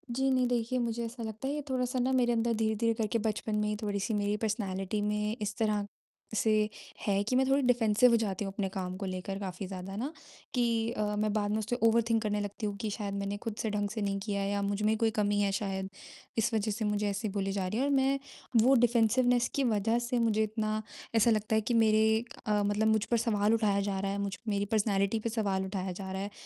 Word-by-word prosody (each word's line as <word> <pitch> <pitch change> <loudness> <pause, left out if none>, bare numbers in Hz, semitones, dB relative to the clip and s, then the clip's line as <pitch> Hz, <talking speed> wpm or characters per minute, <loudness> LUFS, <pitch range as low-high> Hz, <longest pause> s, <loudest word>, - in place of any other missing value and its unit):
जी, 265 +1 +2
नहीं, 255 -1 +3
देखिए, 240 0 0
मुझे 235 0 -1
ऐसा 230 +1 -7
लगता 220 +4 -5
है 280 - -1
ये 295 - -2
थोड़ा-सा 255 -1 -1
ना 255 +2 +1
मेरे 240 -1 +2
अंदर 230 0 +1
धीरे-धीरे 220 +1 +1
करके 225 0 -1
बचपन 215 0 -2
में 210 0 +1
ही 210 - -1
थोड़ी-सी 205 +1 -1
मेरी 205 +1 +1
पर्सनैलिटी 200 -1 -1
में 210 +1 -1
इस 210 0 -2
तरह 210 -2 +1 0.5
से 220 +1 +2 0.5
है 200 -1 +2
कि 250 +4 -1
मैं 265 +1 +4
थोड़ी 275 +1 +4
डिफेंसिव 240 0 +4
हो 235 - +5
जाती 195 0 -2
हूँ 195 - -5
अपने 195 -2 -2
काम 185 -1 -4
को 195 - -4
लेकर 185 +1 -4
काफ़ी 185 -1 -5
ज़्यादा 190 +1 -6
ना, 260 +8 -3 0.4
कि 230 -2 +1
अ, 210 -2 -1
मैं 215 0 0
बाद 205 -1 0
में 215 - +1
उसे 220 +3 -2
ओवरथिंक 230 -1 +3
करने 210 -1 0
लगती 205 +2 -4
हूँ 205 - -2
कि 215 +1 -3
शायद 200 -1 -4
मैंने 200 0 -2
खुद 225 -2 -3
से 220 - -1
ढंग 205 -1 -1
से 215 +1 -4
नहीं 200 -1 -1
किया 200 -2 -1
या 200 0 -1
मुझमें 205 +2 +1
कोई 225 0 +2
कमी 205 0 +2
है 200 -1 +2
शायद। 190 -2 -3 0.5
इस 225 +1 +1
वजह 215 -1 +1
से 220 +1 -2
मुझे 210 0 0
ऐसे 200 +2 -2
बोली 195 0 0
जा 195 -2 -1
रही 210 +5 -2
है 265 - +2
और 285 - +1
मैं 270 0 +2 0.4
वो 265 +4 +5
डिफेंसिवनेस 240 +1 +3
की 280 - +2
वजह 225 0 +2
से 240 +1 -1
मुझे 220 -2 +2
इतना, 215 0 -1 0.3
ऐसा 225 +1 +5
लगता 215 0 +1
है 220 - +3
कि 240 - -2
मेरे 220 0 +4 0.2
अ, 210 -1 +2
मतलब 205 +2 +1
मुझ 220 -1 +3
पर 235 - +1
सवाल 210 0 +3
उठाया 205 -3 +2
जा 195 -1 -2
रहा 195 0 -1
है, 200 - -2
मुझ 190 - -5
मेरी 205 -1 0
पर्सनैलिटी 200 0 +1
पे 230 - -2
सवाल 200 -4 -1
उठाया 190 -1 -3
जा 190 +1 -6
रहा 190 0 -3
है 205 - -4
215 Hz, 240 wpm, -30 LUFS, 200-230 Hz, 0.5 s, हो